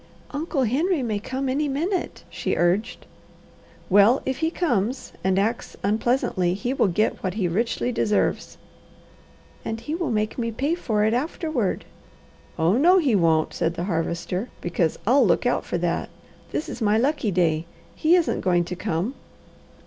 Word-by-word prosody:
"Uncle 290 Hz, -1 st, -1 dB
Henry 290 Hz, -, +1 dB
may 215 Hz, -4 st, -1 dB
come 260 Hz, +5 st, -3 dB
any 285 Hz, +3 st, 0 dB
minute," 340 Hz, +7 st, -2 dB
she -, -, -2 dB
urged. 180 Hz, +5 st, 0 dB, 0.8 s
"Well 205 Hz, +6 st, +5 dB
if 265 Hz, -, -2 dB
he 320 Hz, -, +1 dB
comes 255 Hz, -, -1 dB
and 190 Hz, 0 st, +2 dB
acts 220 Hz, +4 st, -1 dB
unpleasantly, 205 Hz, -4 st, +1 dB
he 245 Hz, +6 st, -2 dB
will 245 Hz, -, +2 dB
get 205 Hz, +4 st, 0 dB
what 185 Hz, -1 st, -2 dB
he 195 Hz, -5 st, 0 dB
richly 230 Hz, +7 st, -1 dB
deserves." 210 Hz, -3 st, 0 dB, 1.1 s
"And 225 Hz, -, -4 dB
he 300 Hz, +6 st, -5 dB
will 340 Hz, 0 st, -1 dB
make 215 Hz, +1 st, -1 dB
me 230 Hz, -1 st, -1 dB
pay 275 Hz, +8 st, -1 dB
for 220 Hz, -11 st, 0 dB
it 220 Hz, -, +2 dB
afterward." 270 Hz, -, -1 dB, 0.7 s
"Oh 170 Hz, +7 st, +3 dB
no 350 Hz, +7 st, +6 dB
he 290 Hz, -10 st, +2 dB
won't!" 165 Hz, -5 st, +2 dB
said 165 Hz, +1 st, -1 dB
the 170 Hz, -, -3 dB
Harvester, 170 Hz, +3 st, -2 dB
"because 170 Hz, -2 st, -1 dB
I'll 260 Hz, +5 st, +5 dB
look 195 Hz, +3 st, +2 dB
out 245 Hz, -, +1 dB
for -, -, -2 dB
that. 170 Hz, 0 st, -1 dB, 0.4 s
This 305 Hz, -, -2 dB
is -, -, -7 dB
my 215 Hz, 0 st, +3 dB
lucky 270 Hz, -1 st, +1 dB
day. 170 Hz, -3 st, +1 dB, 0.3 s
He 325 Hz, +3 st, +3 dB
isn't 345 Hz, -3 st, +1 dB
going 175 Hz, -2 st, +2 dB
to 180 Hz, +1 st, -5 dB
come." 185 Hz, +4 st, -2 dB
225 Hz, 165 wpm, -24 LUFS, 185-270 Hz, 1.1 s, no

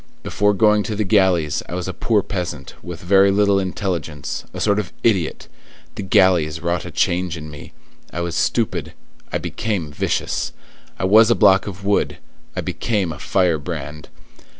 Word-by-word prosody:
Before 105 Hz, 0 st, +1 dB
going 105 Hz, 0 st, +4 dB
to 110 Hz, -, -2 dB
the 105 Hz, -, 0 dB
galleys, 95 Hz, -7 st, +2 dB
I 90 Hz, -, -4 dB
was 90 Hz, 0 st, -3 dB
a 95 Hz, -, -3 dB
poor 105 Hz, -4 st, +1 dB
peasant, 90 Hz, -9 st, -5 dB
with 90 Hz, -1 st, -8 dB
very 95 Hz, +2 st, +5 dB
little 100 Hz, 0 st, +3 dB
intelligence, 90 Hz, -6 st, -3 dB
a -, -, -7 dB
sort 100 Hz, -1 st, +2 dB
of 100 Hz, -, -4 dB
idiot; 95 Hz, -8 st, +1 dB, 0.5 s
the -, -, -6 dB
galleys 95 Hz, -5 st, +3 dB
wrought 85 Hz, 0 st, -2 dB
a -, -, -6 dB
change 90 Hz, -1 st, 0 dB
in 75 Hz, -1 st, -8 dB
me. 75 Hz, -, -11 dB, 0.4 s
I 85 Hz, -, -4 dB
was 85 Hz, -1 st, -3 dB
stupid; 115 Hz, +4 st, -1 dB, 0.4 s
I -, -, 0 dB
became 95 Hz, -9 st, -3 dB
vicious: -, -, -2 dB, 0.4 s
I -, -, -4 dB
was 110 Hz, +4 st, +6 dB
a 120 Hz, -, +4 dB
block 95 Hz, -2 st, +4 dB
of 100 Hz, 0 st, -7 dB
wood; 100 Hz, 0 st, +1 dB, 0.4 s
I -, -, -1 dB
became 90 Hz, +2 st, -1 dB
a -, -, -11 dB
firebrand. 80 Hz, -4 st, -1 dB
95 Hz, 170 wpm, -20 LUFS, 85-100 Hz, 0.5 s, was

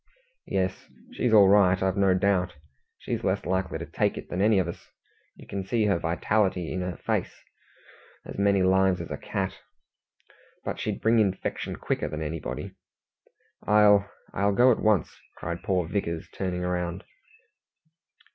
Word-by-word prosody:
"Yes, 95 Hz, 0 st, -2 dB, 0.2 s
she's 125 Hz, -, -1 dB
all 105 Hz, -3 st, +7 dB
right, 95 Hz, -2 st, +5 dB
I've 95 Hz, -1 st, 0 dB
no 95 Hz, -2 st, +3 dB
doubt. 90 Hz, -2 st, +1 dB, 0.4 s
She's -, -, -4 dB
less -, -, 0 dB
likely 95 Hz, -1 st, -1 dB
to -, -, -6 dB
take -, -, -1 dB
it -, -, -8 dB
than 90 Hz, -, -2 dB
any 105 Hz, 0 st, +4 dB
of 95 Hz, -3 st, +1 dB
us. 85 Hz, -, -8 dB, 0.5 s
You -, -, -14 dB
can 100 Hz, -1 st, -4 dB
see 110 Hz, +3 st, 0 dB
her 100 Hz, -4 st, +2 dB
vitality 90 Hz, +1 st, 0 dB
in 95 Hz, -, -2 dB
her 90 Hz, -4 st, -4 dB
face -, -, -1 dB, 0.9 s
as -, -, -8 dB
many 100 Hz, -1 st, +3 dB
lives 95 Hz, 0 st, +3 dB
as 85 Hz, -, -7 dB
a -, -, -3 dB
cat. 95 Hz, -1 st, -4 dB, 1.1 s
But -, -, -3 dB
she'd -, -, -3 dB
bring 115 Hz, +1 st, +3 dB
infection 100 Hz, -3 st, -1 dB
quicker -, -, -2 dB
than 75 Hz, +1 st, -4 dB
anybody." 80 Hz, 0 st, -5 dB, 1.0 s
"I'll 105 Hz, -1 st, +5 dB, 0.2 s
I'll 100 Hz, +1 st, +1 dB
go 125 Hz, +3 st, +6 dB
at 115 Hz, -, +1 dB
once," 105 Hz, -5 st, +2 dB, 0.2 s
cried 85 Hz, -1 st, -5 dB
poor 90 Hz, -4 st, 0 dB
Vickers, 85 Hz, -3 st, -3 dB
turning 90 Hz, -2 st, -3 dB
round. 90 Hz, 0 st, -2 dB
95 Hz, 155 wpm, -26 LUFS, 90-100 Hz, 1.1 s, all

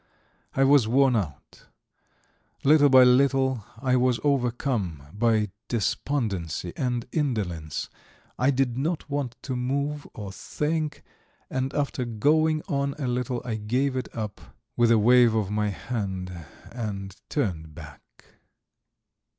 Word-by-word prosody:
I 135 Hz, -, +3 dB
was 135 Hz, -4 st, +5 dB
worn 130 Hz, +2 st, +4 dB
out; 85 Hz, -11 st, -5 dB, 1.0 s
little 145 Hz, 0 st, +6 dB
by 130 Hz, -1 st, +8 dB
little 130 Hz, -1 st, +3 dB, 0.2 s
I 130 Hz, 0 st, +1 dB
was 125 Hz, -1 st, +2 dB
overcome 120 Hz, -, 0 dB
by 110 Hz, -2 st, +1 dB, 0.2 s
despondency 100 Hz, -, -2 dB
and 125 Hz, -3 st, -1 dB
indolence, 100 Hz, -, -2 dB, 0.5 s
I 130 Hz, -, +3 dB
did 130 Hz, -2 st, +1 dB
not 155 Hz, +2 st, -2 dB
want 140 Hz, -4 st, -2 dB
to 130 Hz, -, -3 dB
move 140 Hz, +4 st, -2 dB
or 100 Hz, -3 st, -6 dB
think, 150 Hz, +8 st, -3 dB, 0.5 s
and 130 Hz, 0 st, -1 dB
after 140 Hz, -3 st, -1 dB
going 155 Hz, +7 st, +2 dB
on 140 Hz, -5 st, -1 dB
a 140 Hz, -4 st, -2 dB
little 125 Hz, 0 st, -2 dB
I 115 Hz, -3 st, -2 dB
gave 125 Hz, +6 st, 0 dB
it 130 Hz, -, -3 dB
up 105 Hz, -3 st, -4 dB, 0.3 s
with 120 Hz, -1 st, +4 dB
a 115 Hz, -, +6 dB
wave 120 Hz, +1 st, +5 dB
of 105 Hz, -3 st, 0 dB
my 105 Hz, 0 st, 0 dB
hand 95 Hz, -4 st, -4 dB, 0.4 s
and 100 Hz, -5 st, -5 dB
turned 80 Hz, -, -2 dB
back. 75 Hz, -4 st, -14 dB
125 Hz, 125 wpm, -26 LUFS, 105-140 Hz, 1.0 s, by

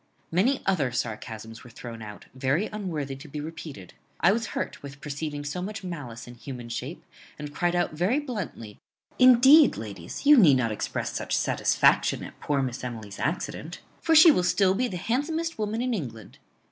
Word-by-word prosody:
Many 230 Hz, +11 st, +2 dB
other 155 Hz, -10 st, +1 dB
sarcasms 115 Hz, -1 st, -5 dB
were 125 Hz, -, -13 dB
thrown 115 Hz, -1 st, -9 dB
out, 105 Hz, -1 st, -9 dB
very 135 Hz, +9 st, 0 dB
unworthy 160 Hz, -10 st, -4 dB
to 145 Hz, +4 st, -11 dB
be 150 Hz, +1 st, -6 dB
repeated. 150 Hz, -, -8 dB, 0.3 s
I 175 Hz, -, +5 dB
was 225 Hz, +1 st, -1 dB
hurt -, -, -4 dB
with 140 Hz, 0 st, -10 dB
perceiving 145 Hz, 0 st, -5 dB
so 145 Hz, +5 st, -4 dB
much 205 Hz, +2 st, -5 dB
malice 145 Hz, -10 st, -7 dB
in 120 Hz, -, -11 dB
human 120 Hz, -1 st, -8 dB
shape, 130 Hz, +7 st, -6 dB, 0.3 s
and 150 Hz, -1 st, -7 dB
cried 175 Hz, +3 st, 0 dB
out 175 Hz, -2 st, 0 dB
very 180 Hz, -, +1 dB
bluntly, 205 Hz, -, -5 dB, 0.4 s
Indeed, 265 Hz, +4 st, +7 dB
ladies, 100 Hz, -, -7 dB
you 295 Hz, 0 st, +8 dB
need 155 Hz, -, +7 dB
not 115 Hz, -3 st, 0 dB
express 105 Hz, -, -3 dB
such -, -, -1 dB
satisfaction -, -, +2 dB
at -, -, -11 dB
poor 140 Hz, -2 st, 0 dB
Miss 125 Hz, -1 st, -4 dB
Emily's 110 Hz, -5 st, -7 dB
accident; 155 Hz, +5 st, -3 dB, 0.2 s
for 325 Hz, -1 st, +3 dB
she 320 Hz, +1 st, +10 dB
will 180 Hz, -, +2 dB
still 180 Hz, +2 st, +3 dB
be 250 Hz, +6 st, 0 dB
the 185 Hz, -, -5 dB
handsomest 315 Hz, -, -2 dB
woman 215 Hz, +2 st, -1 dB
in 250 Hz, -1 st, -1 dB
England. 115 Hz, -, -6 dB
155 Hz, 180 wpm, -26 LUFS, -, 0.4 s, she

